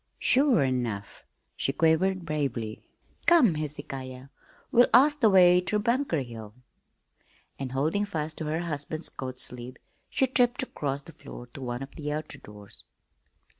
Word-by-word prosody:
"Sure 260 - +3
enough!" 120 -6 -3 0.3
she - - -1
quavered 170 +5 +2
bravely. 135 -8 -3 0.5
"Come, 315 - +6
Hezekiah, 135 -3 -6 0.4
we'll 245 0 +6
ask 295 +4 +5
the 225 -5 +5
way 180 -2 +6
ter 210 +4 0
Bunker 235 - 0
Hill." 110 -3 -10 1.0
And, 135 -2 -4
holding 155 +10 +1
fast 160 -5 -4
to 160 - -3
her 155 +2 -1
husband's 155 -1 -2
coat 130 -1 -6
sleeve, 125 +1 -5 0.3
she 265 - +2
tripped 250 -1 +2
across 140 - -4
the 165 - -12
floor 120 - -11
to 140 - -9
one 120 0 -4
of 135 - -11
the 150 -1 -5
outer 150 -1 -4
doors. 105 -4 -11
150 Hz, 145 wpm, -27 LUFS, 130-190 Hz, 1.0 s, Come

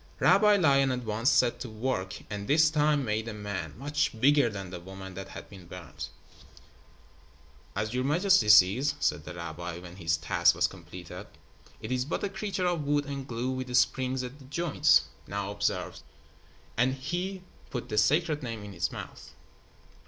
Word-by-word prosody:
Rabbi 210 +1 +5
Lion 140 -7 +4
at 125 -1 -2
once 110 +3 +1
set 120 -4 +3
to 125 - -6
work, 110 -5 -3
and 100 -1 -5
this 155 +1 +5
time 150 -2 +2
made 110 +1 -1
a 115 - -5
man, 100 -7 -5
much 145 -2 -1
bigger 140 0 +5
than 100 -4 -7
the 90 - -6
woman 95 +1 -9
that 95 +1 -7
had - - -9
been 95 -4 -13
burned. 90 -2 -8 1.7
"As 110 +3 -2
your 125 0 0
majesty 160 - +3
sees," 105 +8 +6
said 75 0 0
the 90 - -8
rabbi, 85 0 -6
when 90 0 -11
his 85 -3 0
task 85 +3 +3
was 90 +1 +2
completed, 90 -1 -8 0.5
"it 110 - -6
is 125 0 0
but 150 - -3
a 200 - 0
creature 195 -1 -3
of 175 -4 0
wood 145 0 +1
and 140 -2 -5
glue 120 +1 -2
with 130 -1 -4
springs 130 +1 +1
at 125 +4 -8
the 135 - -14
joints. 150 - +3 0.2
Now 100 0 -3
observe," 105 - -2 0.8
and 130 +3 +2
he 180 +7 -4 0.3
put 125 - -5
the 105 - +2
Sacred 150 +7 +2
Name 115 -5 -5
in 100 -1 -9
its 85 -1 -1
mouth. - - -9
120 Hz, 175 wpm, -29 LUFS, 95-145 Hz, 1.7 s, sees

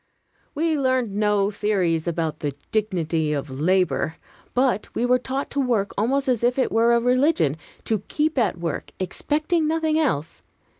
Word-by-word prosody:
We 315 0 +1
learned 255 -5 +1
no 210 -1 +2
theories 185 -6 0
about 160 -2 -2
"the 145 -2 -3 0.2
dignity 165 -7 0
of 140 -1 -3
labor," 165 +2 +1 0.4
but 250 -5 +1
we 235 - +1
were 250 0 +3
taught 265 +2 -4
to 280 - -1
work 235 -7 0
almost 265 +7 +1
as 245 -3 +1
if 245 +2 +2
it 265 - +1
were 230 +1 +4
a - - +4
religion; 250 - +2 0.3
to 220 -2 0
keep 305 -2 0
at 205 -7 +1
work, 170 -3 -4
expecting 305 - 0
nothing 315 0 +1
else. 160 - -1
220 Hz, 160 wpm, -23 LUFS, 175-265 Hz, 0.4 s, were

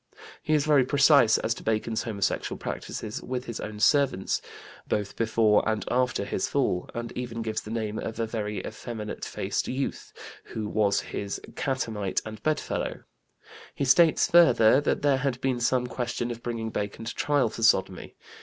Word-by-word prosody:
He 155 - +1
is 150 -1 +2
very 145 -4 +5
precise 140 -3 +5
as 115 - 0
to - - -10
Bacon's 110 0 0
homosexual 100 -4 -2
practices 110 0 -5
with 125 0 -4
his 115 -1 -5
own 105 0 -6
servants, 135 -6 +2 0.5
both 105 -1 -2
before 110 -2 +3
and 110 -1 -1
after 125 -4 +1
his - - -1
fall, 125 -10 0
and 120 0 -4
even 120 -2 -5
gives 110 -1 -2
the - - -10
name 110 -1 -3
of 115 +1 -5
a 115 - +1
"very 105 -3 -4
effeminate 110 -3 -6
faced - - -2
youth" 135 +1 -3 0.3
who 110 -1 -5
was 105 -1 +2
his 100 0 -5 0.2
"catamite 110 -8 -1
and 110 -1 -8
bedfellow"; 155 -1 -2 0.7
he 140 - -1
states, 160 +5 +5
further, 145 -7 +6
that 145 - -1
there 140 -2 +4
had 130 -2 -1
been 130 -2 0
some 125 +1 +1
question 120 0 -3
of 120 0 -7
bringing 115 -2 -4
Bacon 105 +2 -4
to 115 - -4
trial 145 -5 +1
for 115 - -8
sodomy. 95 -5 +2
115 Hz, 170 wpm, -27 LUFS, 110-130 Hz, 0.7 s, further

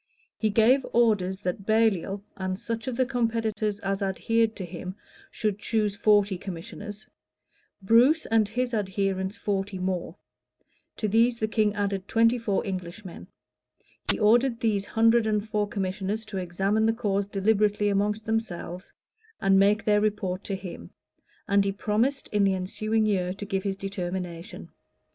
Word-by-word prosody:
He 220 - 0
gave 235 +6 +4
orders 205 -5 +2
that 185 +1 -4
Baliol, 205 -3 +1
and 185 -1 -3
such 230 +1 -4
of 250 -2 -3
the 260 - +3
competitors 225 -3 -1
as 195 0 -2
adhered 225 +3 +1
to 190 - -5
him 180 +2 -7 0.3
should 210 -2 -2
choose 210 -2 0
forty 205 -3 +3
commissioners; 205 +4 -8 0.8
Bruce 245 +10 +5
and 220 -2 +2
his 245 +2 -2
adherents 195 -1 -1
forty 195 -1 -2
more: 185 -1 -3 0.8
to 215 - -1
these 230 +3 +3
the 220 - -1
king 215 -2 +1
added 200 -2 -2
twenty 230 +2 +3
four 210 -4 -1
Englishmen: 185 0 -6 0.8
he - - -1
ordered 235 +3 +3
these 205 -3 +1
hundred 230 0 +3
and 210 0 0
four 210 -1 0
commissioners 200 +2 -3
to 210 -3 -6
examine 195 +4 0
the 225 - +3
cause 200 -4 -1
deliberately 205 +1 +2
among 205 +1 +2
themselves, 190 -5 -3 0.5
and 195 -1 +4
make 205 +2 +3
their 210 -1 +3
report 200 -3 -1
to 195 - -2
him:[*] 180 - -8 0.6
and 200 0 +4
he 195 - 0
promised 220 +7 0
in 210 -1 +2
the 195 -1 +3
ensuing 215 +4 -1
year 185 -3 0
to 205 - -6
give 195 -1 -1
his 195 0 -3
determination. 180 -1 -5
205 Hz, 150 wpm, -26 LUFS, 195-220 Hz, 0.8 s, Bruce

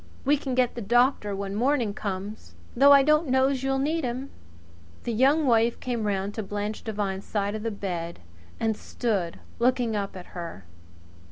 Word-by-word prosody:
We 290 +2 +5
can 270 -3 -3
get 250 -1 +2
the 240 - -6
doctor 240 -1 +2
when 195 0 -4
morning 240 -1 +1
comes 195 - -5 0.2
though 280 +3 +7
I 280 -1 +8
don't 305 +2 +3
know's 265 0 +2
you'll 270 0 0
need 310 +4 0
him." 255 +2 -3 0.7
The 235 - -2
Young 275 +7 +4
Wife 230 -2 +3
came 235 -4 -2
round 200 0 -1
to 220 - -3
Blanche 205 +1 -4
Devine's 200 -3 -3
side 205 -1 -1
of 215 - -4
the 230 - -1
bed 175 -5 -4 0.4
and 225 -1 +1
stood 200 -8 -2 0.2
looking 245 -2 +2
up 200 -2 -3
at 180 - -9
her. 170 - -7
225 Hz, 175 wpm, -26 LUFS, 200-260 Hz, 0.7 s, I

